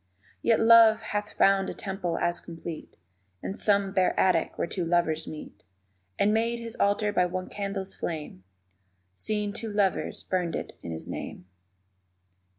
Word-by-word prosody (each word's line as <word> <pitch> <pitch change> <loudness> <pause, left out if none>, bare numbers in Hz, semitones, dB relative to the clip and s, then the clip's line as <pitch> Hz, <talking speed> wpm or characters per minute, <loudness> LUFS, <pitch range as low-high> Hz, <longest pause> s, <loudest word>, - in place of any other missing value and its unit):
Yet 230 - +3
Love 225 -1 +7
hath 210 -1 -3
found 195 0 +4
a - - -5
temple 190 -4 -3
as 175 0 0
complete 165 -1 -8 0.5
In - - -3
some 200 -1 +1
bare 185 -1 +2
attic 180 -4 +2
where - - 0
two 180 +1 -3
lovers 165 -2 +1
meet; 155 - -9 0.6
And 210 +1 +3
made 230 +2 +1
his 230 -1 -6
altar 205 +1 +2
by 180 -2 +3
one 185 +1 -4
candle's 195 -1 -4
flame 150 - -5 0.7
_Seeing 210 - -2
two 225 0 -4
lovers 200 -2 0
burned 180 -3 -1
it - - -5
in 85 - -6
his 80 - -6
name. - - -6
195 Hz, 155 wpm, -27 LUFS, 175-210 Hz, 0.7 s, Love